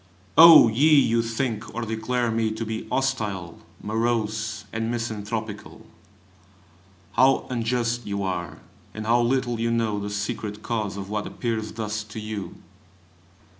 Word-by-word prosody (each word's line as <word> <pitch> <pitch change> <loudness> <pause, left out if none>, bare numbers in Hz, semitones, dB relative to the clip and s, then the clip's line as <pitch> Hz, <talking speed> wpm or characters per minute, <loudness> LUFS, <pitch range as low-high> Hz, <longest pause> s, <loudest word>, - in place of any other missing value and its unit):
Oh! 165 -6 +10
ye 140 +5 +4
who 115 0 +3
think 115 0 -3
or 120 - -2
declare 115 +2 -1
me 110 0 0
to 115 +1 -4
be 110 0 -5
hostile, 105 -10 -2 0.2
morose, 110 -1 -1
and 115 0 -2
misanthropical, 110 -2 -5 1.3
how 130 +1 +3
unjust 120 -1 -1
you 100 -1 -2
are, 85 -4 -3 0.4
and 110 0 -5
how 120 +2 +3
little 120 -1 0
you 115 0 0
know 115 -3 0
the 100 0 -4
secret 105 0 -4
cause 105 -5 -2
of 100 0 -7
what 105 -1 -2
appears 110 -3 -3
thus 110 -1 -3
to 105 +1 -8
you! 105 -2 -6
110 Hz, 135 wpm, -24 LUFS, 105-120 Hz, 1.3 s, Oh